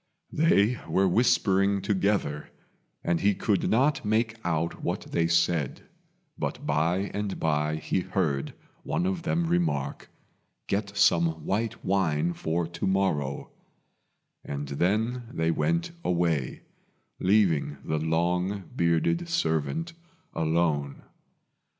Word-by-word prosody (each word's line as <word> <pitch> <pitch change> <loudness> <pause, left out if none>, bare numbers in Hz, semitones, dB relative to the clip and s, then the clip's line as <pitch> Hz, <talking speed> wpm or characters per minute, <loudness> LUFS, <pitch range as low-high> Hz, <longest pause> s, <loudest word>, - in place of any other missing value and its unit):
They 125 -7 +3
were 95 +1 +3
whispering 100 -1 +3
together, 95 -6 0 0.5
and 85 -1 +1
he 100 0 +3
could 100 0 0
not 135 +5 +2
make 110 +1 +1
out 85 -1 -1
what - - -1
they 85 0 +2
said; 85 -4 +1 0.6
but - - -3
by 85 +7 +1
and 100 -1 -3
by 75 -1 +1
he 80 - -1
heard 90 -7 -1 0.3
one 175 - -1
of 185 -2 -1
them 170 0 0
remark, 165 - -1 0.6
"Get 100 0 -2
some 85 -6 +3
white 110 +3 -2
wine 85 -4 +1
for 85 +1 -1
to 85 +2 -4
morrow," 95 -8 0 0.9
and 70 0 -5
then 110 - 0
they 80 -4 0
went 170 - 0
away, 85 -7 0 0.6
leaving 90 -8 +2
the 80 0 -1
long 90 +5 -1
bearded 85 - +1
servant 160 - -1 0.4
alone. 80 -3 0
90 Hz, 115 wpm, -27 LUFS, 80-105 Hz, 0.9 s, They